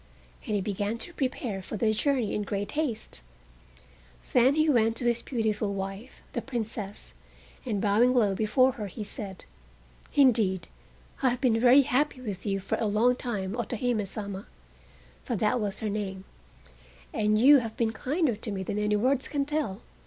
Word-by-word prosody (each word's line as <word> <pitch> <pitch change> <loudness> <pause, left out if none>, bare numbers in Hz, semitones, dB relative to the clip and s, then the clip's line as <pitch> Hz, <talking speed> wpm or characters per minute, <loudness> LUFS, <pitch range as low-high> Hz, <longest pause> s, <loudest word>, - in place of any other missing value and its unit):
And 210 - 0
he 200 - +1
began 205 +3 -2
to 345 +9 -6
prepare 250 - -2
for 215 - -6
the 215 +1 +2
journey 250 -1 0
in 210 - -1
great 205 0 -3
haste. 245 - -3 1.1
Then 255 +3 +5
he 310 0 +3
went 225 -6 +3
to 245 - -4
his 235 -1 +2
beautiful 215 -4 -1
wife, 195 +5 -6
the 240 - -2
Princess, 220 -5 -5 0.5
and 210 -4 0
bowing 215 +5 +4
low 210 -5 +3
before 220 +6 +3
her 225 -5 -6
he 205 +3 -6
said: 200 -2 -7 0.7
"Indeed, 220 -10 +3 0.5
I 260 - +4
have 245 0 -2
been 235 -4 +3
very 255 +4 +7
happy 270 +2 0
with 210 -6 -6
you 195 -1 0
for 195 - -2
a 220 - +1
long 225 +5 +3
time, 210 -7 -3
Otohime 240 -3 -1
Sama" 200 -1 -6 0.8
(for 240 - -2
that 215 +4 +1
was 205 +1 -2
her 215 - -1
name), 195 -2 -4 0.9
"and 215 0 +2
you 280 +4 +8
have 225 -2 -6
been 225 -2 +1
kinder 280 +2 0
to 215 +1 -5
me 190 -1 -3
than 205 +2 -3
any 210 0 +1
words 260 +5 +1
can 285 -2 -1
tell. 295 -10 -2
220 Hz, 175 wpm, -28 LUFS, 205-250 Hz, 1.1 s, you